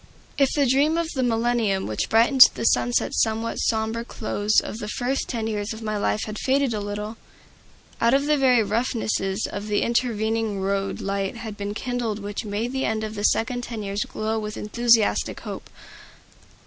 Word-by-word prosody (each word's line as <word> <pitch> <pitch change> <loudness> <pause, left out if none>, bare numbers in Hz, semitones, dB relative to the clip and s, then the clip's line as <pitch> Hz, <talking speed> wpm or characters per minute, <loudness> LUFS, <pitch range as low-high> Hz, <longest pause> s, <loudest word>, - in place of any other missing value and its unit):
If 275 -2 +4
the 285 -2 +3
dream 280 +5 +3
of 335 -1 -1
the 265 - -1
millennium 230 -4 +1
which 110 - -2
brightened 235 +4 +4
the - - -4
somewhat 230 -1 +1
sombre 220 +1 0
close 215 -2 0
of 220 - -6
the 210 - -5
first 250 +5 -2
ten 230 -3 -2
years 210 0 -2
of 220 +1 -9
my 215 -1 -2
life 210 +1 0
had 215 0 -6
faded 270 -2 +1
a 215 - -2
little, 210 +2 -5 0.8
out 235 +3 +4
of 280 +1 +1
the 300 0 +3
very 255 -5 +4
roughnesses 215 -2 -1
of 205 +1 -5
the 210 -1 +1
intervening 225 -3 0
road 195 0 -2
light 195 +2 -2
had 220 -3 -6
been 205 0 -5
kindled 240 -3 -2
which 205 0 -5
made 215 +4 -3
the 265 0 -1
end 220 0 -1
of 215 0 -4
the 205 -1 -2
second 245 +3 +1
ten 230 -3 -6
years 200 +1 -2
glow 220 +1 -2
with 210 0 -5
enthusiastic 230 +1 +2
hope. - - -7
220 Hz, 180 wpm, -24 LUFS, 210-240 Hz, 0.8 s, If